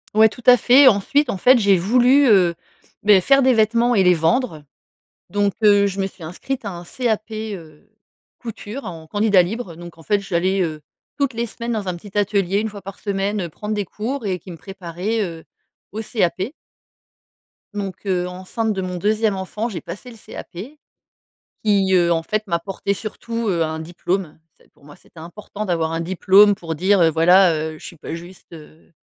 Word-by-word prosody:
Ouais, 220 0 +6
tout 245 - -13
à 250 0 +9
fait. 260 +3 +6
Ensuite, 255 +6 +3
en 195 - -2
fait, 250 +5 +5
j'ai 200 -3 +4
voulu, 250 +8 +4
heu, 180 -6 +4 0.5
beh, 205 -3 +6
faire 275 +5 +4
des 260 -1 +4
vêtements 230 +2 +2
et 195 - +4
les 180 0 +5
vendre 165 - 0 0.7
donc, 205 -1 0
heu, 205 -1 +5
je 195 0 -3
me 190 - 0
suis 185 -2 -12
inscrite 230 +10 -5
à - - -2
un 175 -1 -8
CAP, 220 +1 -2 0.2
heu, 155 -2 -13 0.5
Couture 230 +2 -8
en 165 -2 -8
candidat 205 0 +3
libre, 200 0 -5
heu - - -14
donc 175 -1 -11
en 165 - -15
fait, 205 +1 +1
j'allais, 190 0 0
heu, 155 -3 -4 0.4
toutes 280 -2 0
les 235 +1 -2
semaines 235 +1 -5
dans 205 -4 -3
un 175 - -2
petit 205 +3 -13
atelier, 200 -1 +1
1 220 - -2
fois 200 -2 -10
par 195 +1 -9
semaine, 200 0 -2
heu, 175 - -3
prendre 210 +6 -5
des 205 -3 -2
cours 230 +4 -5
et 185 -2 -1
qui 180 - -13
me 165 - -11
préparaient, 195 +3 -4
heu, 165 -2 -8 0.5
au 220 - -5
CAP. 200 - -1 1.2
Donc, 195 -1 -6
heu, 180 -1 0
enceinte 190 +5 -3
de 190 - -3
mon 180 -1 -4
2e 215 +1 +1
enfant, 210 +5 -4
j'ai 190 - -6
passé 195 +9 -9
le 230 - -13
CAP 175 - -11 1.1
qui, 195 -3 +2
heu, 175 -1 +3
en 165 -1 +1
fait 215 +4 -2
m'apportait 190 +3 -2
surtout, 230 +2 -5
heu, 170 -3 +1
un 160 0 -3
diplôme. 175 +1 -3 0.2
C'est - - -26
pour - - -28
moi, 145 0 -14
c'était 165 - -18
important 210 +4 -8
d'avoir 165 -3 -1
un 165 - -2
diplôme 190 +4 +5
pour 165 -4 -6
dire, 190 +4 +2
heu, 165 - +5
voilà, 175 +2 +5
heu, 155 0 -4
je - - -12
suis 170 - -9
pas - - -7
juste, 175 +2 -10
heu, 155 +1 -15
195 Hz, 200 wpm, -20 LUFS, 175-215 Hz, 1.2 s, à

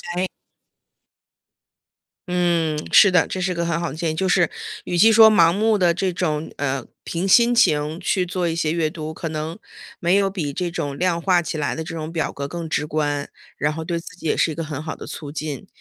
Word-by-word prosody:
诶。 185 +1 0 2.0
嗯， 170 -3 +1 0.2
是 205 - +8
的， 180 -3 +4
这 185 - -4
是 185 +1 0
个 170 -1 -2
很 170 -1 -1
好 170 - -2
的 135 - -7
建 165 0 -1
议， - - -3
就 185 +4 -1
是 180 -1 +3 0.3
与 175 - -3
其 220 +6 +6
说 220 0 +8
盲 170 -5 +5
目 215 +4 +2
地 180 -4 +3
这 180 +2 -1
种 160 -3 -2
呃， 135 -3 -2 0.2
凭 175 +3 -3
心 235 +5 +5
情 155 -8 +2
去 180 0 0
做 180 0 -1
一 165 - -1
些 160 -2 0
阅 160 -2 0
读， 155 -1 -6
可 165 +1 -5
能 155 +2 -4 0.4
没 175 0 +2
有 195 -1 +2
比 165 -8 -4
这 180 +4 -2
种 145 -4 -4
量 175 0 +1
化 180 0 +3
起 160 - -4
来 145 -2 -1
的 160 - -4
这 165 - -7
种 160 0 -5
表 165 - -1
格 140 0 -5
更 170 +1 -6
直 150 - 0
观， 145 -2 -1 0.3
然 150 +1 0
后 160 +1 -5
对 170 +1 -2
自 180 +2 -11
己 170 -3 -6
也 - - +1
是 165 - +2
一 - - -6
个 165 - -3
很 150 -2 -5
好 155 - -5
的 - - -10
促 145 -2 -7
进， 155 +3 -5
170 Hz, 245 characters per minute, -22 LUFS, 155-180 Hz, 2.0 s, 是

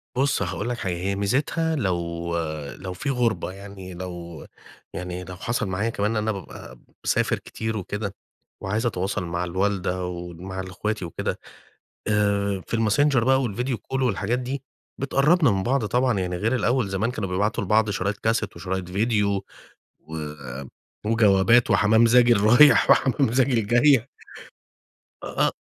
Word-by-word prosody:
بُصّ، 135 -4 +1
هاقول 100 +5 -2
لك 120 - -2
حاجة، 95 -5 -2
هي 95 +3 -2
ميزتها 145 +10 0
لو 85 - -2 0.4
لو 95 -1 -6
في 140 - -4
غُربة، 120 -7 0
يعني 95 -1 -10
لو 85 -3 -8 0.5
يعني 90 +1 -5
لو 90 0 -8
حصل 115 +1 -2
معايا 95 +5 -1
كمان 105 0 -1
إن 110 - -1
أنا 110 +1 0
بابقى 95 -3 -9 0.2
باسافر - - +1
كتير 110 -1 -4
وكده 100 +1 -4 0.5
وعايِز 105 +5 -1
أتواصل 95 -3 -1
مع 85 +1 -2
الوالدة 90 0 -1
ومع 90 +1 -6
ال 95 0 -5
إخواتي 105 +1 -3
وكده، 85 - -4 0.7
آآ، 100 -2 +1
في 115 - -1
الmessenger 115 +3 +3
بقى 135 +1 +3
والvideo 125 +4 -2
call 135 +6 -4
والحاجات 120 0 0
دي 130 +2 -4 0.4
بتقرِّبنا 140 +2 +3
من 95 -1 0
بعض 130 0 +1
طبعًا، 125 0 +1
يعني 90 -1 -2
غير 115 +7 0
الأول 125 -2 +1
زمان 100 +5 -1
كانوا 110 -6 -4
بيبعتوا 105 +4 0
لبعض 105 +2 +2
شرايط 100 +1 -1
كاسيت 110 -2 -1
وشرايط 95 -1 -4
فيديو، 100 -1 0 0.6
و 80 +1 -9 0.9
وجوابات 110 +1 +4
وحمام 110 +2 +5
زاجِل 120 -2 +5
رايِح 120 +8 +6
وحمام 135 -3 +3
زاجِل 125 -4 +2
جايه. 125 +1 +4 1.2
آه، - - +1
105 Hz, 145 wpm, -24 LUFS, 95-120 Hz, 1.2 s, رايِح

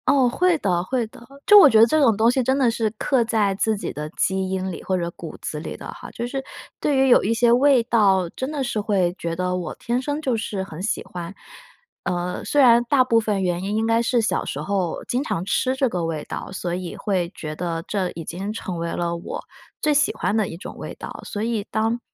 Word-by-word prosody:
哦， 280 -4 +5
会 350 +7 +2
的 175 -6 +1
会 245 +4 -1
的。 220 - -16 0.2
就 415 0 +9
我 300 - +9
觉 220 - +5
得 225 - +9
这 310 +6 +2
种 235 -6 +5
东 225 +1 +4
西 260 - +1
真 260 +2 +1
的 255 -4 +3
是 225 -1 0
刻 260 0 +2
在 220 -4 +1
自 215 +2 +1
己 - - -5
的 150 +1 -5
基 190 +1 0
因 190 0 -2
里 170 - -8
或 185 - 0
者 170 -1 -2
骨 170 -2 -9
子 150 - -4
里 155 - -6
的 - - -9
哈。 - - -10
就 235 - -4
是 270 +2 -4 0.4
对 290 - +1
于 265 0 +4
有 245 - +6
一 220 - +1
些 235 0 +3
味 255 0 +5
道 200 -6 +3
真 260 - -5
的 290 -3 -2
是 225 -4 -1
会 190 -4 +1
觉 170 -1 -3
得 180 +1 -1
我 180 -3 -4
天 240 +2 -2
生 290 +2 -2
就 260 -5 0
是 210 -3 -3
很 170 -3 -8
喜 210 - -1
欢。 175 0 -7 0.7
嗯， 180 0 -2
虽 290 - 0
然 240 -3 +7
大 275 -3 +5
部 230 -2 +3
分 210 -3 -1
原 175 0 -1
因 200 +2 -2
应 220 +1 +1
该 230 0 +3
是 235 0 +2
小 225 - 0
时 140 - -5
候 185 +1 -2
经 250 +3 0
常 180 - -2
吃 255 +6 +1
这 265 0 +2
个 180 -7 -2
味 160 -2 -3
道， - - -6
所 180 -2 -3
以 180 -1 -5
会 185 -4 -1
觉 155 -1 -6
得 165 -1 -3
这 190 -3 -1
已 165 - -6
经 190 +6 -5
成 190 -5 -5
为 170 0 -3
了 170 -1 -2
我 170 - -6 0.4
最 300 - +2
喜 295 +1 +3
欢 - - -1
的 215 -3 +1
一 165 - -7
种 - - -9
味 - - -7
道， - - -8
所 205 - -4
以 225 -2 -1
当 225 +2 0
215 Hz, 265 characters per minute, -23 LUFS, 180-245 Hz, 0.7 s, 就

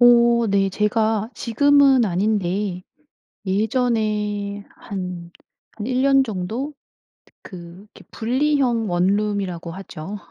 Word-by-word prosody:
어 235 -1 +5
네, 195 -1 +2
제가 215 +2 0
지금은 275 +1 +4
아닌데 195 -1 -1 0.6
예전에 210 -1 -1
한 180 -3 -7 0.5
한 210 - -5
1 255 +1 0
년 275 -1 +5
정도 225 +6 -4 0.7
그 175 +1 -11
이렇게 - - -14
분리형 250 -2 0
원룸이라고 185 -1 -1
하죠. 190 +1 -8
210 Hz, 185 characters per minute, -21 LUFS, 190-240 Hz, 0.7 s, 어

